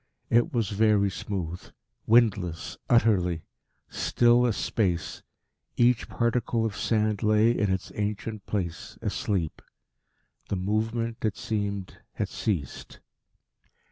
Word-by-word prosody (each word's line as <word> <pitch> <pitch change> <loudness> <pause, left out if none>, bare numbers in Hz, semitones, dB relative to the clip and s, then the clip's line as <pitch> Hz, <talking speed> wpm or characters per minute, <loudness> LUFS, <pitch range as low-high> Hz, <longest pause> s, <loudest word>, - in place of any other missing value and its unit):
It 120 +1 +4
was 115 -5 0
very 105 -1 +3
smooth; 90 -3 -4 0.5
windless 105 -8 +2
utterly; 95 -8 +3 0.4
still 120 +1 +3
as 110 - -1
space; 90 -6 -1 0.6
each 120 0 +3
particle 115 -1 0
of 110 -2 -2
sand 105 -2 0
lay 110 +1 +4
in 105 -4 +1
its 95 - -2
ancient 105 0 -4
place 90 -5 -4
asleep. 90 -7 -2 0.9
The - - 0
movement, 110 +4 -1
it 110 -3 0
seemed, 100 -3 -3
had - - -2
ceased. 85 - -3
105 Hz, 110 wpm, -27 LUFS, 95-115 Hz, 0.9 s, It